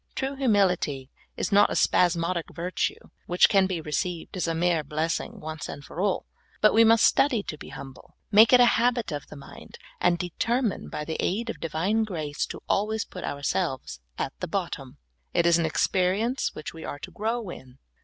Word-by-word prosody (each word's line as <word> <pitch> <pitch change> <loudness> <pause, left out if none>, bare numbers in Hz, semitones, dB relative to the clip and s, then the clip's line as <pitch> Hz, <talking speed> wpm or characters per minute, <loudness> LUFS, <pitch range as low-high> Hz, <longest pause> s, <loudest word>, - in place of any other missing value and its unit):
True 270 0 -2
humility 180 - +1 0.3
is - - -2
not 205 +1 +6
a - - -2
spasmodic 170 -1 +2
virtue 180 +2 -3 0.2
which 175 +1 +5
can 195 -2 +3
be 185 -3 -2
received 160 +4 -3
as 180 - -1
a 165 - -1
mere 170 -1 +1
blessing 155 +3 -3
once 155 0 -6 0.2
for 175 - -6
all, 200 -1 0 0.3
but 215 - +5
we 225 - +6
must 225 0 +6
study 250 -7 +3
to 155 - -5
be - - -11
humble, 135 -1 -11 0.2
make 220 +2 +7
it 250 - +8
a 245 - +8 0.2
habit 240 -4 +1
of 145 -1 -5
the - - -11
mind, 140 - -12 0.2
and 175 -1 +3
determine 220 +6 -1
by 150 - -5
the 160 - -3
aid 230 +5 -1
of - - -11
Divine 175 +8 0
grace 155 -8 -3
to - - -8
always 215 +1 0
put 180 - -9
ourselves 140 - -2 0.2
at - - -3
the - - -3
bottom. - - -4 0.4
It 170 - +3
is 170 0 +5
an 165 - +1
experience 195 - 0
which 155 - -7
we 165 -1 -9
are - - -5
to - - -9
grow 220 -2 -3
in. 130 -4 -12
180 Hz, 190 wpm, -26 LUFS, 160-215 Hz, 0.4 s, it